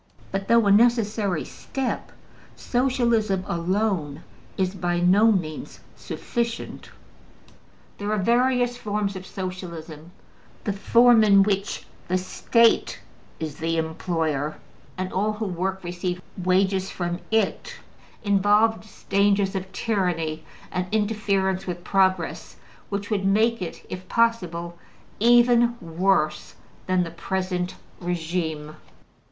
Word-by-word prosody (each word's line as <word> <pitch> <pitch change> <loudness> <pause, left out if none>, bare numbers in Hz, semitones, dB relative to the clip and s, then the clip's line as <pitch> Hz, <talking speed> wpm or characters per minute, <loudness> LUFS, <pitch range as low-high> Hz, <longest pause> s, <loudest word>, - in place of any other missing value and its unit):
But, 195 0 -3
though 230 -1 +5
a 200 - +4
necessary 210 -5 +3
step, 270 -2 -4 0.4
Socialism 235 -6 +1
alone 170 -4 -1 0.3
is 185 -1 0
by 175 -2 -1
no 200 +6 +5
means 160 -7 -3 0.2
sufficient. 235 -1 -4 1.1
There 205 +1 -2
are 215 - +1
various 245 +3 +2
forms 210 -3 -2
of 185 0 -8
Socialism: 170 -4 -7 0.5
the 205 - -1
form 235 +3 +5
in 200 -2 +6
which 200 0 -1 0.2
the 185 - +1
State 230 +5 +2 0.4
is 155 -2 -5
the 165 +1 -1
employer, 160 -2 -1 0.4
and 185 0 -4
all 210 +3 +1
who 215 +1 -4
work 190 +1 -3
receive 180 +1 -3 0.2
wages 190 +1 +1
from 175 -1 -3
it, 225 - 0 0.5
involves 210 +2 +2
dangers 200 0 +2
of 190 -1 -4
tyranny 175 -7 -1 0.3
and 180 0 -2
interference 200 -3 0
with 175 -1 -4
progress 190 -3 0 0.3
which 205 +1 -4
would 200 -2 0
make 220 +3 +2
it, 175 - -6
if 185 0 -8
possible, 175 -8 0 0.4
even 240 +1 +5
worse 165 -2 0 0.3
than 185 -1 +2
the 165 - -6
present 180 +1 -3 0.2
regime. 160 -3 -3
190 Hz, 115 wpm, -24 LUFS, 175-215 Hz, 1.1 s, in